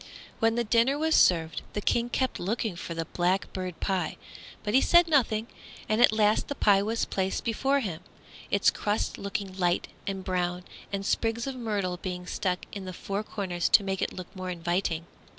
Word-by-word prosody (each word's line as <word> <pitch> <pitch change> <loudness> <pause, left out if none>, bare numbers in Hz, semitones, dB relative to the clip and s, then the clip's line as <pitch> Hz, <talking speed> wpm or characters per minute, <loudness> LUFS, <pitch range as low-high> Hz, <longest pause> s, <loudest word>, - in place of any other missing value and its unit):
When 225 0 +3
the 240 - +1
dinner 235 +5 +3
was 320 +1 +1
served, 165 - +4
the - - -1
King 235 +3 +1
kept 260 +1 -1
looking 215 +1 -1
for 170 0 -6
the 165 0 -2
blackbird 185 0 -1
pie, 190 -4 -1 0.5
but 210 - -2
he 265 - +6
said 345 0 +6
nothing, 230 -8 +2 0.4
and 215 +2 +2
at 245 - +7
last 215 0 +2
the 285 - -4
pie 200 -5 +4
was 225 +3 0
placed 190 0 -1
before 270 +5 +1
him, 180 -7 -4 0.5
its 200 - +4
crusts 210 +1 -1
looking 200 -1 -4
light 175 -1 +1 0.2
and 195 -1 -3
brown, 180 -1 -1 0.3
and 195 0 -3
sprigs 225 +2 0
of 270 - -3
myrtle 205 -7 -2
being 180 -1 -5
stuck 180 0 -2
in 200 -2 -6
the 185 - -6
four 200 +3 -3
corners 185 -5 -2
to - - +6
make 195 -1 -2
it - - 0
look 185 +1 -9
more 185 -1 -5
inviting. 175 -1 -1
195 Hz, 185 wpm, -28 LUFS, 180-225 Hz, 0.5 s, at